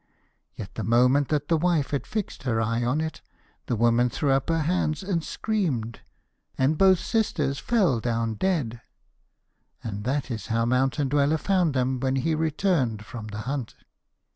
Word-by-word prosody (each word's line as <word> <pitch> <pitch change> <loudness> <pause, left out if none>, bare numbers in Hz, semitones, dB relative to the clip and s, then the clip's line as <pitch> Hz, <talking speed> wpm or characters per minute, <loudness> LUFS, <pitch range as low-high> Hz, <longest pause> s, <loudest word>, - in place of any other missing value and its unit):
Yet - - -8
the - - -4
moment 125 +6 +3
that 150 -1 -1
the 165 -2 +2
wife 170 -4 +1
had 140 - -2
fixed 215 -3 -4
her 120 -4 0
eye 115 +2 0
on 130 +6 +1
it, 160 -1 -4 0.5
the 120 - 0
woman 120 +2 +3
threw 140 +3 0
up 135 +3 +1
her 165 -1 +1
hands 160 0 0
and 180 -4 -1
screamed, 145 - -2 0.6
and 135 +4 +2
both 190 +2 +5
sisters 150 - -1
fell 190 - +2
down 115 -1 -1
dead; 120 - -1 1.0
and 105 -3 -5
that 135 +1 -1
is 110 -4 -5
how 115 0 +1
Mountain 130 +3 +1
Dweller 145 +2 +2
found 180 -4 +1
them 130 0 0
when 130 +1 0
he 145 +5 0
returned 155 - 0
from 110 +1 -8
the 105 0 -6
hunt. 130 0 -4
135 Hz, 165 wpm, -26 LUFS, 120-160 Hz, 1.0 s, both